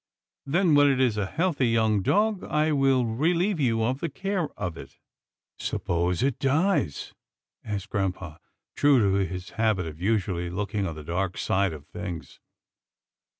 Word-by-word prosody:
Then 170 +3 +3
when 145 0 +6
it 135 -2 +1
is 125 -5 +2
a 105 -2 -1
healthy 160 - 0
young 110 -3 +2
dog, 210 - +1
I 155 +1 +1
will 135 -3 +3
relieve 165 - +1
you 115 -5 +1
of 130 +4 0
the 170 - -2
care 190 +1 -2
of 85 -2 -3
it." - - -11 0.6
"Suppose 90 +2 -1
it 135 -2 0
dies?" 145 - 0 0.5
asked 105 0 -5
grampa, 90 -6 -3 0.4
true 145 -1 +4
to 100 -2 +2
his 90 +1 -6
habit 110 -6 +2
of 80 0 -8
usually 95 -4 0
looking 100 +2 -2
on 80 - -5
the 75 - -8
dark 85 +3 -2
side 100 -1 +1
of 75 -2 -9
things. 90 -2 -7
110 Hz, 155 wpm, -26 LUFS, 95-145 Hz, 0.6 s, when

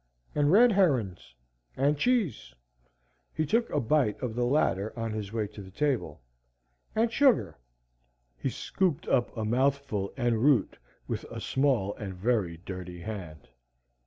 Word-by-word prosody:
And 145 0 +2
red 235 +5 +7
herons. 125 - +1 0.4
And 140 +3 +3
cheese." 200 - 0 0.8
He 155 - 0
took 230 +8 +1
a 150 - 0
bite 130 -3 +1
of 125 -4 -3
the 120 +1 0
latter 110 -6 +1
on 115 -1 -2
his 105 -2 -5
way 110 -1 -1
to 105 - -10
the 95 - -11
table. 100 - -2 0.7
"And 225 +1 +2
sugar." 265 - +3 0.8
He 60 - -2
scooped 175 -5 -1
up 120 -2 +1
a 110 - -2
mouthful 130 -4 0
en 120 -3 +1
route 130 -3 +3 0.3
with - - -3
a - - -7
small 130 -8 +1
and 95 -3 -6
very 95 -4 0
dirty 90 -1 -8
hand. 90 -8 -7
120 Hz, 145 wpm, -28 LUFS, 100-145 Hz, 0.8 s, red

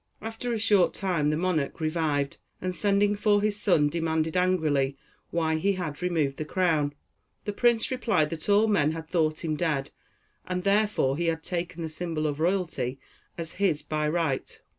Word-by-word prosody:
After 225 +3 -4
a 230 - 0
short 210 -4 +3
time 175 -7 0
the 150 - +1
monarch 165 -5 -1
revived, 155 -3 0 0.2
and 185 0 -2
sending 205 +1 +2
for 205 0 +3
his 205 0 0
son 160 -8 +4
demanded, 160 0 -1
angrily, 155 -7 +1 0.3
why 160 -2 0
he 195 +5 +1
had 175 -5 -5
removed 160 -6 0
the - - -2
crown. 155 -3 +1 0.5
The 205 - -2
prince 235 +1 +2
replied 215 -12 +1
that 165 +3 -5
all 205 +2 +5
men 160 -8 +2
had 160 0 -7
thought 160 -1 0
him 155 -1 0
dead, 150 -4 -1 0.6
and 180 0 -2
therefore 200 -9 +2
he 170 - -1
had 160 -1 -1
taken 175 -1 -3
the - - -2
symbol 160 -1 -3
of 145 -1 -1
royalty 165 -7 -1 0.4
as 165 -1 -3
his 185 -7 0
by 150 0 -1
right. 160 -5 -1
165 Hz, 175 wpm, -27 LUFS, 155-195 Hz, 0.6 s, all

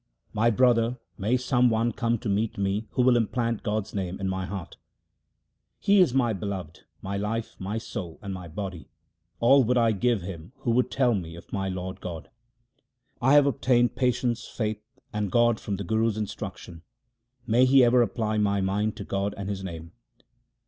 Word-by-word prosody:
My 115 +3 +3
brother, 120 0 +3 0.2
may 110 +5 +1
some 125 -1 +2
one 115 +1 +1
come 115 +1 0
to 110 - -7
meet 105 +2 0
me 100 +2 -1
who 125 - +2
will 125 0 +5
implant 115 0 0
God's 105 0 -2
name 95 -2 -3
in 95 - -2
my 95 0 -2
heart! 95 -3 -7 1.0
He 200 0 +3
is 180 -8 +5
my 120 -3 +2
Beloved, 95 -4 -6 0.2
my 100 +1 -3
life, 110 +3 -3
my 100 +4 -3
soul, 100 -7 -6
and 100 -1 -4
my 90 -2 -7
body; 90 0 -6 0.5
all 135 +3 +6
would 125 +2 +1
I 115 -1 +4
give 110 -1 +1
him 90 +3 -8
who 120 - 0
would 125 +2 +2
tell 125 -3 +2
me 85 -5 -4
of 85 - -13
my 95 -1 -1
Lord 95 +1 -5
God. 85 -3 -7 0.9
1 130 +3 +3
have 145 -1 +7
obtained 125 -2 +2
patience, 125 -2 0
faith, 110 -2 -3 0.3
and 105 -2 -2
God 120 -1 +3
from 100 - -3
the 100 - -4
Guru's 110 +3 0
instruction; 90 -5 -6 0.6
may 125 +2 +4
he 130 0 +6
ever 120 +1 +5
apply 110 -1 0
my 100 -1 +2
mind 100 +3 0
to - - -5
God 100 +1 -2
and 100 0 -4
His 95 -1 -4
name 85 -3 -7
110 Hz, 185 wpm, -26 LUFS, 95-120 Hz, 1.0 s, have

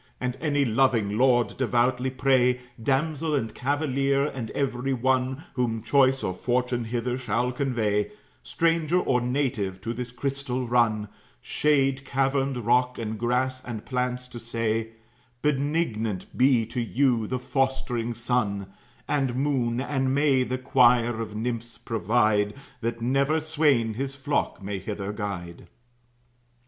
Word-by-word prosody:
"And 125 -1 -2
any 145 -3 +2
loving 115 -4 +2
lord 120 0 +3
devoutly 125 0 +1
pray, 130 -1 +2 0.2
Damsel 150 +4 0
and 115 -5 -2
cavalier, 140 0 +1
and 130 -6 -4
every 135 -1 -1
one, 130 +3 0
Whom 115 -3 -1
choice 135 +1 +3
or 95 - -1
fortune 125 +2 -1
hither 120 +2 -2
shall 125 +1 0
convey, 115 -6 0 0.3
Stranger 165 0 +1
or 125 -7 +1
native, 120 -7 -1
to 115 - -3
this 125 0 -5
crystal 130 -1 -3
run, 115 -3 +2 0.3
Shade, 135 - +1
caverned 135 0 0
rock, 125 +1 +2
and 110 -1 -4
grass, 130 +2 0
and 115 -3 -6
plants, 125 -1 -2
to 120 - -8
say, 115 -1 -2 0.5
'Benignant 140 - -1
be 125 -3 +4
to 120 +2 -3
you 120 -1 +1
the 130 - -1
fostering 125 -2 -1
sun 105 -5 -1 0.3
And 135 -4 0
moon, 130 -4 0
and 135 -1 0
may 140 -2 +3
the 125 0 -1
choir 120 -3 +3
of 105 -2 -6
nymphs 115 +1 -3
provide, 105 -2 +1 0.2
That 115 -1 -3
never 135 +6 +2
swain 145 -8 +2
his 135 +4 -4
flock 140 -6 -2
may 100 0 -3
hither 100 +1 -4
guide.'" 95 -5 -6
125 Hz, 135 wpm, -26 LUFS, 115-135 Hz, 0.5 s, be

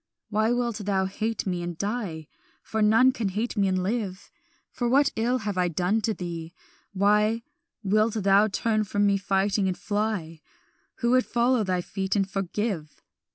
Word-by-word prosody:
"Why 215 +1 +1
wilt 240 -2 0
thou 200 -2 0
hate 215 +3 -3
me 180 -2 -2
and 175 -1 -5
die? 200 -7 -3 0.4
For 220 - -2
none 225 +5 +5
can 230 -6 -2
hate 215 +6 -2
me 200 -2 +2
and 185 -1 0
live. 200 -2 -3 0.5
What 270 +4 +3
ill 235 +3 +1
have 205 -5 -3
I 180 - +3
done 180 +6 0
to 220 - 0
thee? 170 -1 -6 0.4
why 210 +3 +2 0.4
Wilt 215 +3 +2
thou 200 0 +4
turn 215 +1 0
from 205 0 0
me 200 -1 +3
fighting, 195 0 +1
and 185 - -2
fly, 205 -7 -2 0.6
Who 235 0 +2
would 255 0 +3
follow 240 0 +2
thy 185 -2 0
feet 190 +2 -3
and 195 -2 +1
forgive? 195 -4 -3
205 Hz, 165 wpm, -26 LUFS, 190-225 Hz, 0.6 s, none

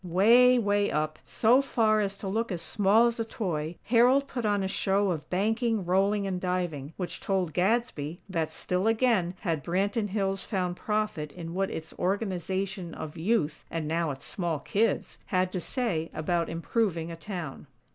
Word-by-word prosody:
Way, 230 +8 +6
way 205 -2 +2
up, 155 0 -1
so 240 +4 +4
far 220 -5 +2
as 200 -1 -2
to 195 - -6
look 225 +3 -1
as 170 -2 -3
small 210 +5 +4
as 235 -1 0
a - - +1
toy, 175 -8 -3
Harold 250 +4 +4
put 245 -5 -2
on 205 -1 +1
a - - 0
show 195 0 +1
of 155 -3 -4
banking, 220 +2 0
rolling 195 +3 +2
and 185 -2 -2
diving, 175 -6 -2
which 180 -2 -4
told 185 -5 -1
Gadsby 180 -5 0
that, 165 -5 -2
still 180 +5 -1
again, 225 -6 +2
had 165 -7 -1
Branton 200 +4 0
Hills 195 -1 0
found 180 -4 -2
profit 210 -8 -2
in 165 0 -7
what 195 +1 0
its 160 - -6
Organization 190 -2 -2
of 155 +1 -7
Youth, 160 -3 0
and, 165 -2 -3
now, 165 +1 0
its 135 -1 -6
small 170 -4 -2
kids, 205 +9 -1
had 185 -1 +1
to 185 - -2
say 175 - -2
about 170 +2 0
improving 170 -1 -1
a - - -5
town. 165 -5 -6
190 Hz, 175 wpm, -28 LUFS, 170-215 Hz, -, Way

